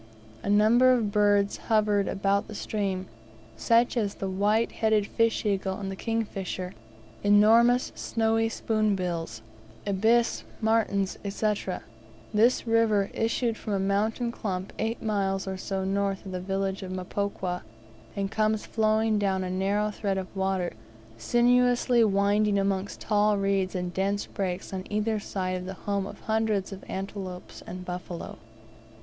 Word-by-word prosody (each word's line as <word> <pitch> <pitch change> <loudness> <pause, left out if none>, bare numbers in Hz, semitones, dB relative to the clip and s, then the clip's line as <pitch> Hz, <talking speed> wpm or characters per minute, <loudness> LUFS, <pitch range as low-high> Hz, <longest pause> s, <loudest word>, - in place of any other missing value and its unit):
A - - -4
number 225 +5 +5
of 225 -5 +1
birds 205 -1 +3
hovered 210 -2 +2
about 200 +2 0
stream, 195 -3 -2 0.5
such 230 - +3
as 210 -4 0
the 195 - -4
white 205 +4 +1
headed 220 -2 +2
fish 230 +2 +1
eagle 195 -1 -1
and 195 -1 -4
the - - -5
kingfisher, 195 -4 -3 0.5
enormous, 225 +4 +5
snowy 225 0 0
spoonbills, 185 - -1 0.4
ibis, 220 +4 +2 0.2
martins, 215 -3 +1
&c. 210 +2 +1 0.8
This 230 +5 +3
river 225 -3 +2
issued 230 0 0
from 210 - -4
a 195 - +1
mountain 215 +5 0
clump 190 -5 -4
eight 225 +1 -2
miles 195 -3 0
or 190 - -2
so 190 0 -3
north 195 0 -1
of 190 - -6
the 180 -1 -4
village 195 +1 -2
of 185 -1 -6
Mpokwa, 185 -1 -3 0.5
and 195 -1 -2
comes 215 0 +1
flowing 220 -1 +2
down 190 -2 0
a 180 - -3
narrow 200 +3 0
thread 200 -2 -2
of 190 +1 -6
water, 190 -2 -1 0.5
sinuously 245 - +3
winding 205 0 +2
amongst 195 0 -1
tall 210 -1 +2
reeds 195 -1 0
and 180 -1 -3
dense 200 +1 0
brakes 185 -1 -4
on 185 -1 -3
either 215 +1 0
side 185 -3 -3
the 190 - -5
home 200 -1 0
of - - -10
hundreds 220 -3 0
of 195 0 -8
antelopes 190 -2 -6
and 180 0 -7
buffaloes. 180 -1 -6
200 Hz, 140 wpm, -27 LUFS, 190-220 Hz, 0.8 s, number